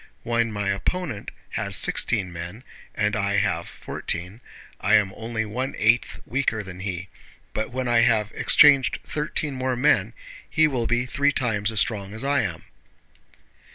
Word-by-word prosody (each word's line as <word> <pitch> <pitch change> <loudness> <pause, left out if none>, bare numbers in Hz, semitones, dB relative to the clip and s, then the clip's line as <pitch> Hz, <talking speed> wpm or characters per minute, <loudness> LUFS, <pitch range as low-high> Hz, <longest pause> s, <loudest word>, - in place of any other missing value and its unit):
When 115 -1 0
my 100 -1 -2
opponent 115 - -2 0.2
has - - -1
sixteen 95 -6 +2
men 90 +8 -7 0.3
and 105 0 +1
I 100 -1 0
have 95 -5 0
fourteen, 90 +7 -5 0.4
I - - +3
am 100 -2 +3
only 110 0 -3
one 125 +6 -3
eighth 115 +3 +2
weaker 120 -5 -1
than 95 -2 -9
he, 95 -1 -4 0.5
but 110 - -2
when 130 +1 -3
I 120 -1 +3
have 110 -2 +3
exchanged 140 -6 +5
thirteen 150 -1 -2
more 130 -1 -1
men 120 -4 +2 0.4
he 160 0 +4
will 125 -6 -1
be 120 +1 +1
three 140 +3 +1
times 110 -6 0
as 110 -3 +1
strong 105 -2 -2
as 110 - -7
I 140 0 +2
am. 85 -7 -4
110 Hz, 155 wpm, -24 LUFS, 100-125 Hz, 0.5 s, exchanged